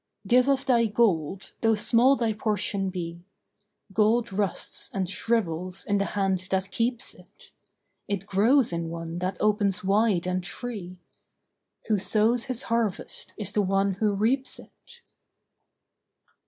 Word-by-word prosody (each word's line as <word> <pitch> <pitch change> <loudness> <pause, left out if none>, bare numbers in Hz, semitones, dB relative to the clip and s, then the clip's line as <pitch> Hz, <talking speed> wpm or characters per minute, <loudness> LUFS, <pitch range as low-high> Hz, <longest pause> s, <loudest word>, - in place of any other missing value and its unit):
Give 250 +1 +4
of 275 0 +1
thy 235 -4 +3
gold, 195 -5 0
though 225 -1 +3
small 240 +5 +4
thy 230 -4 0
portion 205 -2 -1
be. 170 -2 -5 0.7
Gold 220 +1 +2
rusts 200 -1 -2
and 195 -6 -2
shrivels 185 -4 -1
in 205 -1 +1
the 200 - +1
hand 190 -2 0
that 190 0 -1
keeps 235 +3 -1
it. - - -19 0.6
It 200 -2 -3
grows 215 +4 +3
in 170 -1 -2
one 165 0 -5
that 185 +1 -2
opens 205 -3 +1
wide 200 -2 +2
and 185 0 -1
free. 185 -2 -6 0.9
Who 215 -2 +1
sows 225 +5 +2
his 255 -1 -2
harvest 230 -5 -1
is 210 -4 -1
the 210 - +2
one 195 0 +1
who 210 -2 +1
reaps 250 +6 0
it. 475 0 -17
205 Hz, 140 wpm, -26 LUFS, 185-230 Hz, 0.9 s, Give